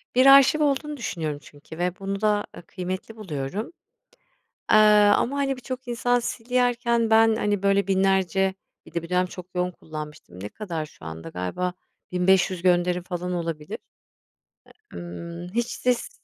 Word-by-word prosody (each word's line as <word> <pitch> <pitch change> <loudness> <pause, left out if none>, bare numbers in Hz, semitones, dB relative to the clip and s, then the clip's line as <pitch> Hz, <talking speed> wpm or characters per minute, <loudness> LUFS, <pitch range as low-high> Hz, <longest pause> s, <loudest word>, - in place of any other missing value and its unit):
Bir 255 - +5
arşiv 275 +2 +7
olduğunu 295 +1 0
düşünüyorum 155 - -3
çünkü 145 +2 -13
ve 180 +1 -2
bunu 195 +1 -4
da, 210 -1 +2
ııı, - - -10
kıymetli 185 +4 -5
buluyorum, 185 - -5 1.0
aaa, 210 -1 +6
ama, 275 +4 -1
hani, 275 -1 0
birçok 255 0 -7
insan 245 +1 +1
silerken 235 -1 0
ben, 225 0 +5
hani, 205 -3 0
böyle, 200 0 +3
binlerce, 190 -1 +2 0.3
bir - - -15
de 170 - -1
bir 170 - -9
dönem 180 +1 +2
çok 180 0 -9
yoğun 180 0 0
kullanmıştım, 150 - -9
ne 100 - -5
kadar 165 - -5
şu - - -16
anda, 80 0 -7
galiba, 90 - -3 0.4
1.500 180 0 +2
gönderim, 180 0 +2
falan, 180 0 -4
olabilir. 165 -3 -4 1.2
E - - -7
ımm, 170 - -7
hiç 235 +1 0
sis 250 - -1
190 Hz, 150 wpm, -25 LUFS, 170-230 Hz, 1.2 s, arşiv